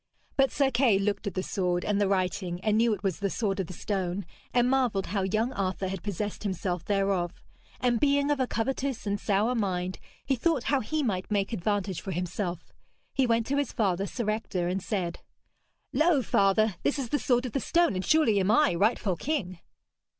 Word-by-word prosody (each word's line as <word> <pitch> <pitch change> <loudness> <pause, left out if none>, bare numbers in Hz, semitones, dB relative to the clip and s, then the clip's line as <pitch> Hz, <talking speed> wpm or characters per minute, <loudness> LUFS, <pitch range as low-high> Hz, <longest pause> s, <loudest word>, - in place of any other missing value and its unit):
But 270 -1 +4
Sir 275 -2 +1
Kay 240 -5 +4
looked 200 +1 -1
at 195 - -4
the 185 - -1
sword, 180 -3 -1
and 205 -1 +1
the 200 - +3
writing, 185 -2 -1
and 215 +1 +2
knew 230 +1 +4
it 205 -2 -3
was 190 -4 -1
the 200 0 0
sword 200 -1 -1
of 190 - -1
the 185 - -8
stone, 190 0 -2 0.3
and 245 0 +3
marvelled 250 -7 +1
how 200 +2 -1
young 215 +6 0
Arthur 190 -1 -2
had 190 -2 -4
possessed 205 +1 -4
himself 185 -3 -2
thereof; 195 -3 +1 0.5
and 240 -2 +2
being 285 +1 +3
of 290 - +1
a 260 - +1
covetous 265 +2 -2
and 200 0 -1
sour 210 +4 +1
mind 185 -5 -1 0.3
he 270 - +1
thought 280 0 +1
how 275 - +4
he 305 +6 -1
might 185 -7 -2
make 205 +1 0
advantage 200 -2 -1
for 190 - -4
himself. 180 0 -4 0.4
He 265 -2 +2
went 230 -1 +2
to 280 +3 -1
his 285 -3 0
father, 195 -2 0
Sir 235 0 -4
Ector, 190 -5 -2
and 185 +2 -1
said: 180 -4 -2 0.7
'Lo, 310 -4 +3
father, 200 -1 +2
this 290 - +1
is 260 -4 -3
the 290 - +1
sword 245 -1 +1
of 250 - -4
the 275 - 0
stone, 340 +2 +2
and 185 0 -2
surely 295 -9 +4
am 190 +1 +1
I 255 +4 +4
rightful 200 +1 +1
king.' 185 - -2
205 Hz, 205 wpm, -28 LUFS, 190-245 Hz, 0.7 s, But